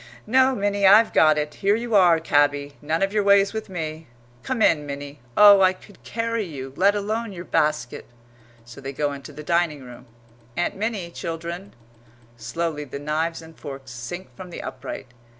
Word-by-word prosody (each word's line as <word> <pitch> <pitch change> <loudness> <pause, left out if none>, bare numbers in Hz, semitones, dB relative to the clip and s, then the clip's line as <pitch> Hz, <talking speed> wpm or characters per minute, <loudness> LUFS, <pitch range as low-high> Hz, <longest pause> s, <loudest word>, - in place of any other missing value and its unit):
No, 260 +3 +4
Minnie, 200 -1 +2
I've 215 +4 +6
got 155 -1 +5
it; 150 0 -2
here 200 +1 +1
you 230 0 -4
are, 175 -5 +6
cabby 145 -2 +1
none 155 +5 0
of 195 +1 0
your 210 - +2
ways 200 0 +4
with 220 -2 -5
me. 160 -3 -5 0.3
Come 245 - -1
in, 150 -6 +3
Minnie. 140 0 -7 0.2
Oh, 205 -1 +9
I 185 0 +5
could 195 +2 -18
carry 230 0 -2
you, 135 -7 -7
let 200 +5 +3
alone 215 +1 -2
your 175 -1 -8
basket!" 150 -6 -1 0.6
So 120 +3 -12
they 135 +1 -6
go 145 +1 -1
into 140 +1 -9
the 150 +1 -9
dining 170 -3 0
room. 125 -1 -12 0.5
"Aunt 175 - 0
Minnie, 200 -4 -3
children." 170 +4 -6 0.6
Slowly 150 +7 -3
the 140 -1 -7
knives 160 +3 -2
and 160 0 -14
forks 135 -4 -9
sink 125 +10 -8
from 185 -2 -9
the 175 - -8
upright. 130 +1 -7
170 Hz, 180 wpm, -23 LUFS, 145-200 Hz, 0.6 s, Oh